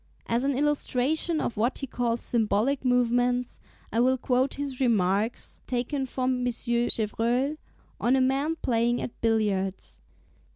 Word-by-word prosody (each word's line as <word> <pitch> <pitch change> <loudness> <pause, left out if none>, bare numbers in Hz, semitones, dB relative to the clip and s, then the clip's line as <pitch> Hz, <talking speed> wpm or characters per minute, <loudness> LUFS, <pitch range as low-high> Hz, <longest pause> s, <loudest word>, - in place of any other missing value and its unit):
As 235 +2 0
an 275 -1 0
illustration 295 +2 0
of 235 - -3
what 235 +5 +1
he 275 - -4
calls 240 -2 -2
symbolic 235 +4 +1
movements, 245 0 +1 0.3
I 225 - +1
will 260 +2 +3
quote 260 +1 0
his 280 -2 -5
remarks 210 -2 0
(p. 255 - -2
37), - - +1
taken 275 0 -2
from 255 0 -1
M. 250 - -2
Chevreul, 240 +3 0 0.4
on 250 +2 +3
a 265 - +3
man 275 +5 +1
playing 240 0 +1
at 240 - -7
billiards. 205 -4 -1
245 Hz, 150 wpm, -27 LUFS, 230-265 Hz, 0.4 s, will